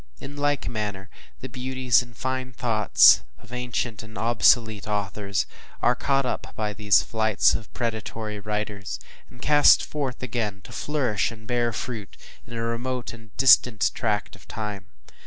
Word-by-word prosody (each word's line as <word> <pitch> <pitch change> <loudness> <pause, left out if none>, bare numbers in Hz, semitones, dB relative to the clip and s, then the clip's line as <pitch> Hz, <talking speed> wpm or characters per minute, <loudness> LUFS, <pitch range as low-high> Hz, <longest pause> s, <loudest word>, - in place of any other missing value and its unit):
In 145 - -9
like 145 -1 0
manner, 105 -3 -4 0.3
the 130 - -5
beauties 130 -1 +1
and 120 -2 -13
fine 130 0 -3
thoughts 115 -3 +5 0.2
of 120 +1 -15
ancient 125 -3 -3
and 110 -2 -11
obsolete 110 -1 +3
authors 100 -1 -1 0.3
are - - +3
caught 135 -1 0
up 125 - -4
by 105 -1 -2
these 105 -1 +3
flights 110 -2 +2
of 110 - -5
predatory 110 -2 -4
writers, 105 -1 -4 0.3
and 125 - -12
cast 145 -1 +6
forth, 135 -4 -4
again 110 -5 -3
to - - -12
flourish 130 -9 -1
and 110 -1 -12
bear 120 -1 0
fruit 110 -3 -6 0.3
in 115 - -10
a 115 - -2
remote 120 +2 -3
and 115 -2 -15
distant 125 -4 +5
tract 105 -4 -2
of 100 - -19
time. 105 -3 -5
115 Hz, 155 wpm, -25 LUFS, 105-125 Hz, 0.3 s, cast